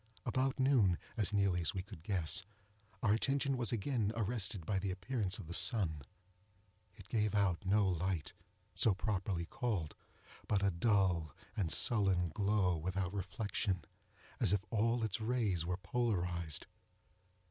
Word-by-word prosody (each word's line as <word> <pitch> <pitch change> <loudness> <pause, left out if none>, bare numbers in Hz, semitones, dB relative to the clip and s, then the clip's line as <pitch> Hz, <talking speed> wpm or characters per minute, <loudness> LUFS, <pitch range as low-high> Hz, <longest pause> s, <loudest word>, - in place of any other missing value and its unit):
About 130 +3 0
noon, 125 -10 +4 0.2
as 105 -2 0
nearly 100 -3 +2
as 85 - -1
we 95 - -2
could 85 -4 -11
guess, 95 +1 0 0.6
our 105 - +4
attention 135 +4 +1
was 120 -4 0
again 115 -1 0
arrested 105 -5 -1
by 95 +2 0
the 100 +1 -2
appearance 100 +1 -2
of 100 - -8
the 85 - -7
sun. 85 - +2 0.9
It 100 0 -13
gave 105 -2 0
out 100 -4 +2
no 100 +1 +4
light, 90 -2 -1 0.6
properly 95 -4 -1
so - - -9
called, 100 -11 -1 0.5
but 100 -2 +1
a 100 - +3
dull 90 -4 +2 0.2
and 95 -8 0
sullen 95 -6 +3
glow 100 0 +2
without 95 +3 -2
reflection, 100 -1 -2 0.5
as - - +3
if 100 0 0
all 115 +1 +2
its 110 0 0
rays 110 -8 0
were 90 0 -1
polarized. 90 -8 -1
100 Hz, 145 wpm, -36 LUFS, 90-110 Hz, 0.9 s, noon